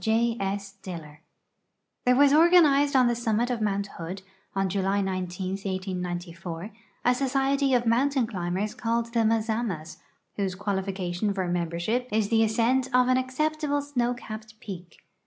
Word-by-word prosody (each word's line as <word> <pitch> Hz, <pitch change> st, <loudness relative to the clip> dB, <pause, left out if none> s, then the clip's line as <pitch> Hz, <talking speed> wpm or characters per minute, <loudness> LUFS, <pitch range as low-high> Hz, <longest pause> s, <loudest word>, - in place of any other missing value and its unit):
THE 230 Hz, +1 st, +2 dB
MAZAMAS 190 Hz, -6 st, -5 dB, 0.9 s
There 250 Hz, -, +6 dB
was 280 Hz, +1 st, +5 dB
organized 305 Hz, -4 st, +5 dB
on 255 Hz, -1 st, +6 dB
the 240 Hz, -, +3 dB
summit 235 Hz, +1 st, 0 dB
of 235 Hz, -2 st, -2 dB
Mount 200 Hz, -1 st, 0 dB
Hood, 180 Hz, +4 st, -6 dB, 0.3 s
on 195 Hz, 0 st, +1 dB
July 195 Hz, +1 st, 0 dB
19, 185 Hz, -1 st, -2 dB
1894, 180 Hz, -2 st, -4 dB, 0.3 s
a 245 Hz, -, +5 dB
society 270 Hz, +1 st, +1 dB
of 240 Hz, -1 st, +1 dB
mountain 260 Hz, +3 st, +2 dB
climbers 195 Hz, 0 st, -2 dB
called 235 Hz, -1 st, -1 dB
the 235 Hz, -, +2 dB
Mazamas, 220 Hz, -7 st, -1 dB, 0.4 s
whose 195 Hz, -2 st, -1 dB
qualification 190 Hz, 0 st, -2 dB
for 190 Hz, -2 st, -1 dB
membership 175 Hz, +8 st, -1 dB
is 210 Hz, -1 st, +1 dB
the 225 Hz, -1 st, +3 dB
ascent 235 Hz, +4 st, +2 dB
of 250 Hz, -1 st, +3 dB
an 255 Hz, -, +4 dB
acceptable 290 Hz, +3 st, -1 dB
snow 245 Hz, -4 st, 0 dB
capped 215 Hz, -2 st, -9 dB
peak. 180 Hz, -5 st, -9 dB
220 Hz, 140 wpm, -27 LUFS, 190-250 Hz, 0.9 s, There